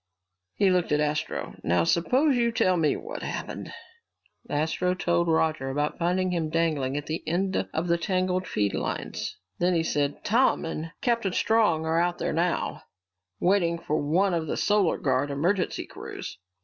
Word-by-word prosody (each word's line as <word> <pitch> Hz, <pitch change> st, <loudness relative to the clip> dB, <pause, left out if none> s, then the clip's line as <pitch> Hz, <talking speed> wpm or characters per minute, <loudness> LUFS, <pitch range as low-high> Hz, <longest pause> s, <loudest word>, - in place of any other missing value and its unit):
He 195 Hz, -2 st, +3 dB
looked 180 Hz, -3 st, +1 dB
at 150 Hz, -, +3 dB
Astro. 150 Hz, +1 st, -2 dB
"Now 85 Hz, 0 st, +2 dB
suppose 255 Hz, -, +3 dB
you 235 Hz, -1 st, +2 dB
tell 185 Hz, -5 st, +2 dB
me 160 Hz, -4 st, +2 dB
what 460 Hz, +3 st, -7 dB
happened!" -, -, -5 dB, 0.8 s
Astro 160 Hz, +5 st, 0 dB
told 170 Hz, -1 st, +1 dB
Roger 160 Hz, -4 st, +1 dB
about 145 Hz, +2 st, -1 dB
finding 180 Hz, +2 st, +1 dB
him 165 Hz, -3 st, -1 dB
dangling 155 Hz, -5 st, 0 dB
at 145 Hz, -, -4 dB
the 160 Hz, +1 st, -3 dB
end 190 Hz, +3 st, 0 dB
of 160 Hz, +2 st, -2 dB
the 170 Hz, 0 st, +2 dB
tangled 185 Hz, 0 st, 0 dB
feed 100 Hz, -1 st, 0 dB
lines. -, -, -3 dB, 0.2 s
Then 180 Hz, +1 st, +2 dB
he 165 Hz, -, +2 dB
said, 145 Hz, -2 st, -1 dB
"Tom 235 Hz, -1 st, +3 dB
and 165 Hz, 0 st, -4 dB
Captain 235 Hz, -7 st, +1 dB
Strong 210 Hz, -9 st, +2 dB
are 160 Hz, +1 st, +2 dB
out 175 Hz, 0 st, 0 dB
there -, -, -2 dB
now, 170 Hz, +2 st, -1 dB, 0.6 s
waiting 175 Hz, -2 st, +2 dB
for 155 Hz, -2 st, -1 dB
one 175 Hz, +6 st, +2 dB
of 165 Hz, -2 st, -1 dB
the -, -, -2 dB
Solar 205 Hz, -5 st, +2 dB
Guard 135 Hz, +1 st, 0 dB
emergency 175 Hz, +7 st, 0 dB
crews." -, -, -8 dB
170 Hz, 165 wpm, -26 LUFS, 155-185 Hz, 0.8 s, He